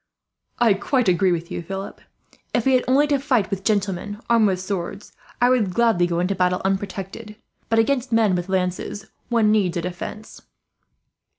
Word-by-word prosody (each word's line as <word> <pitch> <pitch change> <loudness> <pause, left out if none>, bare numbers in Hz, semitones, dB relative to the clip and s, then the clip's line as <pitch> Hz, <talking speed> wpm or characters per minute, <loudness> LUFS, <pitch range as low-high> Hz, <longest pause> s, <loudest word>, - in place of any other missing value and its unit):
"I 230 -3 +4
quite 230 +5 0
agree 185 +1 +3
with 170 -1 -3
you, - - -3
Philip. 195 +3 -7 0.5
If 235 - +1
we 265 - +4
had 255 - +3
only 270 +3 +4
to 290 -2 +1
fight 250 -7 0
with 195 -1 -3
gentlemen 205 -1 -1
armed 230 -2 +5
with 185 -2 0
swords, 190 +1 -5 0.3
I 245 - +4
would 215 -8 +1
gladly 225 -7 +3
go 170 -1 -1
into 180 +3 0
battle 180 -1 +1
unprotected; 195 +2 -3 0.3
but 225 - +2
against 250 +2 +1
men 225 -4 +3
with 175 +1 -2
lances, 190 +1 -2 0.2
one 225 -3 +3
needs 190 -5 +1
a - - -1
defence. 180 +4 -7
200 Hz, 175 wpm, -22 LUFS, 185-230 Hz, 0.5 s, armed